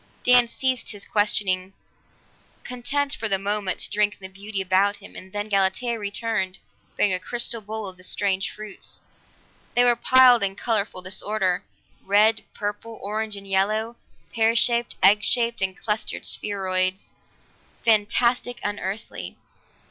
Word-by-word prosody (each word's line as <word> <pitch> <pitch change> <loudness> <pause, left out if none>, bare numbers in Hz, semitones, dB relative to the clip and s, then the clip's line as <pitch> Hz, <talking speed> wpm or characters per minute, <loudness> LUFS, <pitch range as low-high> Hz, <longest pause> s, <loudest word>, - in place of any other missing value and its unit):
Dan 250 -1 +6
ceased 255 +1 -2
his 205 -1 -9
questioning, 195 -3 +1 0.9
content 275 +3 -2
for 225 -7 -2
the 195 - +2
moment 200 -1 -1
to - - 0
drink 210 0 +2
in - - -34
the 190 0 -10
beauty 200 +1 -4
about 190 +2 +2
him 205 - -14
and 185 - -11
then 205 +1 -3
Galatea 205 +4 0
returned 205 -2 -2 0.4
bearing 205 - +3
a 185 - -1
crystal 235 +3 -2
bowl 215 0 -5
of 185 -1 -8
the 185 - -13
strange 195 0 0
fruits. 210 -2 -7 0.7
They 245 - +5
were 245 -1 +5
piled 250 0 +6
in 195 -1 0
colorful 210 -4 -1
disorder, 190 0 0 0.4
red, 210 +3 +3
purple, 210 +2 -5
orange 215 +1 -3
and 200 0 -9
yellow, 215 +4 0 0.4
pear 225 0 +2
shaped, 235 0 +2
egg 205 +1 +6
shaped, 235 +1 +3
and 190 -1 -1
clustered 215 0 -3
spheroids 190 -2 -1 0.7
fantastic, 235 +3 +2
unearthly. 205 +1 -5
210 Hz, 140 wpm, -24 LUFS, 195-230 Hz, 0.9 s, Dan